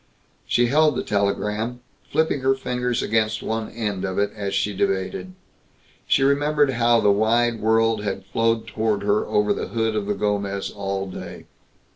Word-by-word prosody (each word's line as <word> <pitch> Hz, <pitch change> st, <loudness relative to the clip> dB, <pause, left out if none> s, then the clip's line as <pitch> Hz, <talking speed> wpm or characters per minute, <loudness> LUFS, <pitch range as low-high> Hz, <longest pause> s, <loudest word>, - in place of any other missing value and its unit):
She 120 Hz, -, +3 dB
held 150 Hz, +3 st, +3 dB
the -, -, -2 dB
telegram, 105 Hz, +4 st, -1 dB, 0.3 s
flipping 160 Hz, -3 st, +1 dB
her 135 Hz, +1 st, +3 dB
fingers 125 Hz, -2 st, -2 dB
against 110 Hz, 0 st, 0 dB
one 110 Hz, 0 st, -2 dB
end 105 Hz, -5 st, -3 dB
of 95 Hz, -1 st, -3 dB
it 100 Hz, 0 st, +1 dB
as 100 Hz, -2 st, -3 dB
she 100 Hz, +2 st, 0 dB
debated. 95 Hz, -1 st, -2 dB, 0.7 s
She 135 Hz, -, +3 dB
remembered 145 Hz, +1 st, +3 dB
how 120 Hz, -2 st, +3 dB
the 105 Hz, -, +4 dB
wide 115 Hz, +3 st, +2 dB
world 110 Hz, 0 st, +2 dB
had 95 Hz, -2 st, -3 dB
flowed 115 Hz, +2 st, 0 dB
toward 110 Hz, -2 st, -1 dB
her 105 Hz, +1 st, +2 dB
over 105 Hz, -1 st, +2 dB
the -, -, -4 dB
hood 115 Hz, -1 st, -1 dB
of 105 Hz, -2 st, -2 dB
the 105 Hz, -, 0 dB
Gomez 100 Hz, -1 st, -2 dB
all 95 Hz, -1 st, -3 dB
day. 95 Hz, -, -8 dB
110 Hz, 165 wpm, -23 LUFS, 100-120 Hz, 0.7 s, the